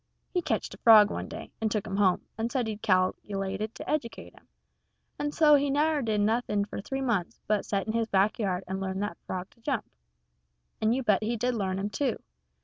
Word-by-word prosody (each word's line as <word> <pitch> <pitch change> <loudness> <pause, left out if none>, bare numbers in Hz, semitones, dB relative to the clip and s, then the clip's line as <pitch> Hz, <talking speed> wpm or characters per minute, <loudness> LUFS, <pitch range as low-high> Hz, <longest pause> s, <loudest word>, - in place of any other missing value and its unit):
He 360 - +1
ketched - - -2
a - - -12
frog 215 -3 +8
one - - -4
day, - - -8
and 220 - +1
took 210 -1 -1
him 195 -1 -3
home, 190 -3 +3
and 225 +2 -2
said 255 -3 0
he 220 -1 -3
cal'lated 195 +1 -1
to - - -8
educate 275 -7 -3
him; - - -21 0.7
and 290 0 -1
so 300 -1 +5
he 285 0 +4
never 300 +2 +2
done 215 -4 +1
nothing 215 -2 +1
for 205 - -6
three 270 +6 -4
months 225 -9 -1
but 210 -1 0
set 200 -1 -1
in 220 - -2
his 230 -1 0
back 200 +2 +2
yard 190 -3 -1
and 190 +1 -3
learn 190 0 -3
that 205 - -4
frog 185 0 -4
to 230 - -26
jump. 270 +3 -1 1.0
And 220 +2 +3
you 265 - -1
bet 210 -4 +3
you 215 - -2
he 235 - 0
did 245 +3 0
learn 190 -4 -1
him, 200 +2 -3
too. 275 +4 0
215 Hz, 225 wpm, -28 LUFS, 195-245 Hz, 1.0 s, frog